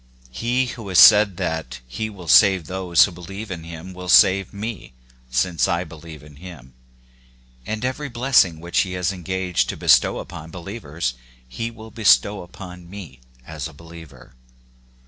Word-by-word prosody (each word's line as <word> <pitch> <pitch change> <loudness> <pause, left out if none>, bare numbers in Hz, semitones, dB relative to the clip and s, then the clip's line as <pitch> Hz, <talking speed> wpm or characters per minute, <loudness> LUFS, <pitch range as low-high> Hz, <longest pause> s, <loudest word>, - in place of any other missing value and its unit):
He 120 - -1
who 115 -4 -8
has 90 - 0
said 105 -1 +7
th>^^ 80 -8 -4
he 110 - -4
will 95 -5 -12
save 90 +6 +5
those 90 -1 +3
who 100 - -7
believe 95 +5 -9
in 85 -3 -6
him 85 +2 -9
will 90 0 -8
save 95 0 +5
n^^\^ 105 - -7 0.4
since 80 +7 0
I 85 +1 -1
believe 80 -2 -12
in 75 -1 -16
him; 75 -7 -12 0.9
and 110 +3 -3
every 140 +3 -3
blessing 120 -9 +2
whic::^ 85 +1 -10
^ - - +6
he 95 - -4
has 90 0 -1
engaged 90 0 -2
to - - -4
bestow - - +3
upon 80 - -9
believers 85 - -5 0.3
he 115 - -5
wi'i 110 -1 -13
"^ - - -25
bestow 105 -2 +3
upon 90 0 -12
me 90 -10 -10 0.3
as 80 0 -6
a 80 - -14
believer. 80 -4 -14
90 Hz, 165 wpm, -21 LUFS, 80-100 Hz, 0.9 s, said